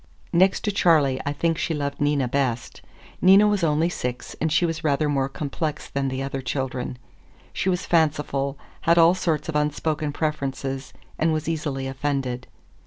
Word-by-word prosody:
Next 185 +3 +4
to 210 - 0
Charley, 155 -9 +3
I - - +1
think 165 +3 0
she 165 - -1
loved 140 -1 -3
Nina 145 -3 +2
best. 125 -2 -2 0.4
Nina 195 +3 +7
was 205 -3 +1
only 160 +1 +2
six, 125 -7 -4
and 160 0 +1
she 175 - +3
was 165 -1 -3
rather 150 0 +2
more 135 -2 0
complex 150 +2 -4
than 140 0 -2
the 130 0 -2
other 135 0 -3
children. 130 -1 -3 0.6
She 190 - 0
was 180 -1 0
fanciful, 145 -4 +1 0.3
had 170 - +6
all 165 +1 +7
sorts 170 -4 -1
of 160 - -4
unspoken 150 0 0
preferences, 135 -3 -3 0.3
and 160 +1 +3
was 155 0 -2
easily 150 -5 -2
offended. 135 -2 -2
150 Hz, 170 wpm, -24 LUFS, 135-165 Hz, 0.6 s, Nina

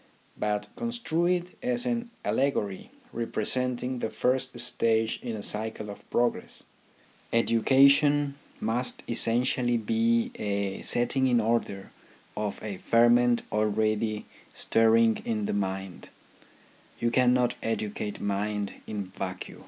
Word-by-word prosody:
But 105 0 -1
construe 235 -8 -1
it 180 0 -1
as 250 -1 -1
an 240 -1 -2 0.2
allegory 110 -8 -1 0.2
representing 125 +2 -1
the 110 - -2
first 130 +1 -1
stage 115 -2 0
in 120 -3 -4
a 105 - -6
cycle 110 -1 -2
of 100 - -13
progress. 120 0 -1 0.7
Education 140 +5 +4 0.3
must 120 +3 -1
essentially 120 +1 +3
be 115 +1 +1
a 100 -2 -2
setting 130 +2 +1
in 120 -2 +3
order 110 -3 -1 0.4
of 105 -1 -3
a 105 -3 -5
ferment 120 +3 +4
already 110 0 0 0.3
stirring 115 0 +3
in 110 -2 -2
the - - -2
mind: 95 -2 -4 0.9
you 120 - 0
cannot 125 0 +3
educate 105 -2 -3
mind 100 0 -2
in 105 -2 -4
vacuo. 95 0 -6
115 Hz, 115 wpm, -27 LUFS, 105-125 Hz, 0.9 s, Education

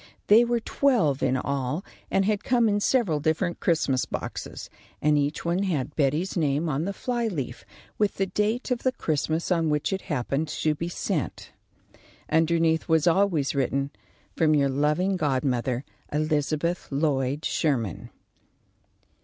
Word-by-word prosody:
They 220 +3 +7
were 240 0 +1
twelve 220 - +1
in 130 - +2
all, 140 +5 -2 0.2
and 195 0 +2
had 210 -1 0
come 240 -2 +3
in 205 -1 +2
several 205 - +2
different 160 +3 0
Christmas 145 -6 +1
boxes, - - -6 0.3
and 150 0 +3
each 145 +2 -1
one 170 +3 +1
had 165 -10 -1
Betty's 155 +6 0
name 155 -1 +1
on 150 +3 -1
the 200 - -1
fly 240 +3 -2
leaf, 140 - -4 0.4
with 210 -1 +1
the 195 - +1
date 210 +7 -1
of 245 - +1
the 260 - +1
Christmas 160 - -1
on 165 -3 +2
which 150 +5 0
it 190 - -2
happened 140 +2 -1
to 150 +1 0
be 170 +3 -4
sent. 170 - -3 0.8
Underneath 160 0 +2
was 160 -2 +3
always 175 -5 +2
written: 140 0 0 0.4
"From 155 -2 +3
your 140 -2 +3
loving 150 +8 +1
godmother, 130 -4 0 0.3
Elizabeth 155 +3 0
Lloyd 140 0 0
Sherman." 120 - -1
160 Hz, 145 wpm, -26 LUFS, 140-190 Hz, 0.8 s, They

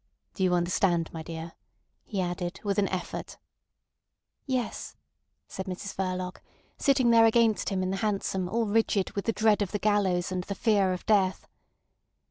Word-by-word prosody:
Do 190 - -2
you 180 -1 +3
understand, 175 -1 +1
my 165 - -5
dear?" 165 +1 -7 0.5
he 200 -4 -3
added, 175 0 -3
with 200 -1 0
an 200 - +2
effort. 185 -1 -5 1.1
"Yes," 255 -4 -3 0.5
said 190 +1 -6
Mrs 190 +2 -5
Verloc, 185 -1 -3 0.3
sitting 265 -4 +3
there 230 -1 +7
against 225 -1 +3
him 190 -1 -1
in 185 - -1
the 195 - -1
hansom 195 -3 -1
all 230 +3 0
rigid 210 -2 +1
with 200 - -4
the 225 - +2
dread 215 -1 +3
of 200 - -1
the 205 - 0
gallows 195 -4 +1
and 185 -1 -2
the 200 - -4
fear 200 -3 +2
of 180 - -4
death. 195 -3 +2
195 Hz, 165 wpm, -28 LUFS, 180-215 Hz, 1.1 s, there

